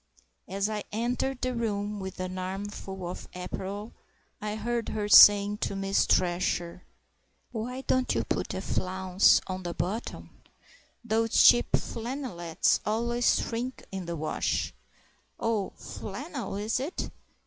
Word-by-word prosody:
As 195 +1 -1
I 210 -1 -3
entered 245 +4 -1
the 255 0 0
room 210 -3 -2
with 190 -1 -7
an 185 0 -4
armful 190 0 -5
of 180 - -7
apparel 195 +4 -5 0.5
I 210 0 -3
heard 235 +1 -2
her 210 -1 -2
saying 205 0 +8
to 200 - -2
Miss 195 0 +1
Thresher, 175 -1 +1 0.7
"Why 250 +3 -4
don't 255 -1 +1
you - - +1
put - - -2
a 190 - -3
flounce 185 0 +3
on 185 0 -4
the 175 -1 -5
bottom? 190 +9 -4 0.6
Those 225 0 +3
cheap 240 - +6
flannelettes 230 - 0
always 235 +3 +1
shrink 245 +3 -4
in 190 -3 -5
the 170 - -3
wash.... 155 -1 -1 0.7
Oh, 220 -4 0
flannel 270 - -6
is 210 +4 -1
it?... 290 +8 -4
205 Hz, 130 wpm, -28 LUFS, 190-235 Hz, 0.7 s, saying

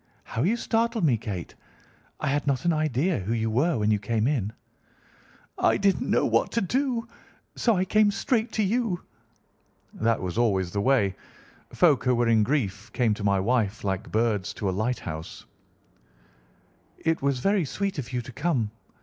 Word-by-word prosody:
How 115 - -4
you 205 - +2
startled 230 -2 0
me, 140 -7 +4
Kate! 105 -6 -5 0.7
I - - -3
had 145 +1 -1
not 135 0 0
an 170 - +3
idea 155 +3 +1
who 100 +4 -2
you 115 -1 0
were 135 +6 +2
when 105 0 +1
you 105 - +2
came 110 +2 0
in." 120 -7 0 1.1
"I - - +3
didn't 195 -1 +1
know - - +3
what - - +2
to 230 - +1
do, 240 +2 -1 0.5
so 230 -3 +2
I 185 - +1
came 215 +2 +4
straight 225 +2 0
to 215 - +1
you." 210 -3 0 0.9
That 115 0 +1
was 95 +4 -3
always 95 -6 +1
the 100 - -1
way. 105 -5 +3 0.6
Folk 155 -7 +3
who 125 -1 +3
were 120 0 +1
in 110 -1 +4
grief 105 -4 -1
came 115 -4 +2
to 105 - -6
my 100 -1 +2
wife 110 0 0
like 95 -2 -3
birds 110 -3 0
to 100 - -3
a - - -4
lighthouse. 95 -7 -4 1.5
"It 160 0 0
was 140 -1 +1
very 195 +8 +2
sweet 195 +4 -3
of 125 -2 -6
you 125 -1 -2
to 120 - -9
come. 130 -6 -1
125 Hz, 175 wpm, -26 LUFS, 105-175 Hz, 1.5 s, me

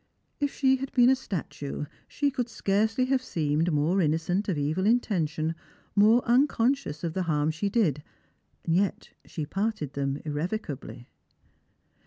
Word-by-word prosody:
If 285 -1 0
she 265 -1 +3
had 270 +1 -5
been 245 0 +6
a - - +5
statue, 155 - -5 0.2
she 285 -1 0
could 250 -3 -2
scarcely 220 +4 +1
have 260 0 +1
seemed 160 - 0
more 160 +6 +2
innocent 165 +6 0
of 175 - 0
evil 155 +7 0
intention, 165 -9 +1 0.4
more 220 +4 +5
un 255 +5 +5
conscious 235 - -1
of 165 -2 -2
the 190 - -1
harm 150 0 +2
she 180 +6 -2
did; 185 - +1 0.6
yet 185 +4 0
she 155 - -5
parted 195 -5 -2
them 140 0 -1
irrevocably. 150 - -4
190 Hz, 145 wpm, -27 LUFS, 155-235 Hz, 0.6 s, been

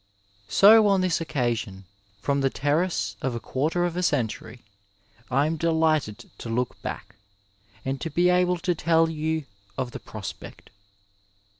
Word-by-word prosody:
So 215 +2 +7
on 195 -2 +3
this 180 -3 +1
occasion, 120 -10 -2 0.4
from 140 0 0
the 135 - +2
terrace 145 - -1
of 130 -2 -2
a - - -3
quarter 155 +9 -1
of 175 -1 -3
a 180 - -1
century, 120 -6 -2 0.7
I 135 +3 +2
am 160 +1 -1
delighted 155 -8 0
to 115 - -7
look 125 +2 -2
back, - - -7 0.7
and 135 0 -3
to 165 - -3
be 175 +4 +3
able 180 0 +2
to 180 +1 0
tell 165 0 +2
you 160 -1 -2 0.3
of 125 -1 -2
the - - -7
prospect. 105 -3 -9
155 Hz, 150 wpm, -25 LUFS, 125-170 Hz, 0.7 s, So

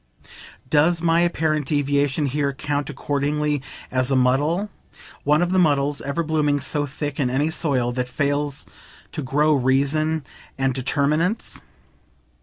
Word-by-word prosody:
Does 155 +5 +3
my 165 0 +3
apparent 155 -4 +1
deviation 145 0 +1
here 140 +1 0
count 145 0 -2
accordingly 145 0 -1 0.3
as 130 0 0
a 135 - +2
muddle? 145 +10 +2 0.5
one 150 +3 +4
of 175 - -1
the 185 - +3
muddles 145 -3 +2
ever 140 +4 -2
blooming 150 -2 +1
so 145 +1 -1
thick 145 +1 -5
in 130 -3 +1
any 145 +5 0
soil 130 -7 +1
that 125 0 -3
fails 145 +1 -1 0.5
to - - -4
grow 150 +3 +2
reasons 140 +4 +1 0.3
and 135 -1 +1
determinants. 150 - 0
145 Hz, 135 wpm, -22 LUFS, 135-155 Hz, 0.5 s, one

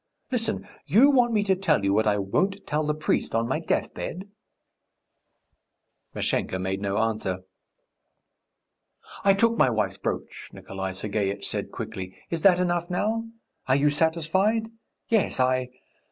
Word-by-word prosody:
Listen; 235 -3 -2 0.2
you 265 +8 +6
want 245 -3 +4
me 210 -2 +2
to 195 -2 +2
tell 165 - +1
you 100 0 +2
what 110 +1 +2
I 105 -1 +3
won't 190 - -1
tell 150 0 0
the 150 0 0
priest 155 -6 -1
on 115 +1 +1
my 135 +5 0
deathbed?" 180 +3 -3 1.9
Mashenka 95 - -1
made 95 +1 -2
no 100 0 -1
answer. 110 -4 -1 1.8
"I 195 0 +5
took 230 +3 +2
my 130 - +5
wife's 110 -5 -1
brooch," - - -5
Nikolay 95 0 -6
Sergeitch 100 0 -2
said - - -1
quickly. 95 0 -6
"Is 165 -1 -1
that 180 -1 +6
enough 175 -1 0
now? 220 +5 0 0.4
Are 130 - +4
you 145 +1 +3
satisfied? 175 +9 +1 0.4
Yes, 220 - +1
I 130 0 +2
150 Hz, 140 wpm, -26 LUFS, -, 1.9 s, you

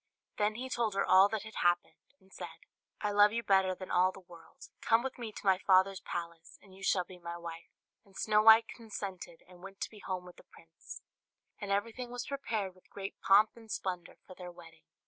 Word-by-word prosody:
Then 210 +1 +1
he 255 +3 -5
told 235 -5 -1
her 200 - +1
all 190 +2 +6
that 220 -2 -3
had 220 0 -10
happened, 175 0 +1 0.2
and 190 0 -23
said, 170 -2 -9 0.4
"I 210 - 0
love 205 +1 +5
you 235 0 -1
better 190 -2 +3
than 185 0 -8
all 185 +1 +4
the 195 - -12
world; 175 -3 -15
come 225 +1 +3
with 265 -1 -5
me 230 -2 -5
to 210 - -11
my 190 -1 +4
father's 190 0 +4
palace, 170 -1 -7
and 195 - -19
you 190 - -15
shall 185 -1 +2
be 180 +1 -13
my 170 0 -6
wife." 170 -1 -9 0.3
And 195 -3 -18
Snow 215 -1 +3
White 225 +1 +8
consented, 195 -7 -7
and 180 -1 -16
went 195 +1 -6 0.2
home 185 -1 -3
with 180 - -13
the - - -15
prince; 165 0 -13 0.6
and 205 - -6
everything 230 +5 -2
was 245 0 -5
prepared 225 -8 -3
with 185 - -25
great 195 0 -7
pomp 205 +2 +5
and 225 -1 -15
splendour 180 -3 -4
for 185 - -11
their 180 -1 -9
wedding. 165 -2 -16
195 Hz, 210 wpm, -32 LUFS, 180-215 Hz, 0.6 s, White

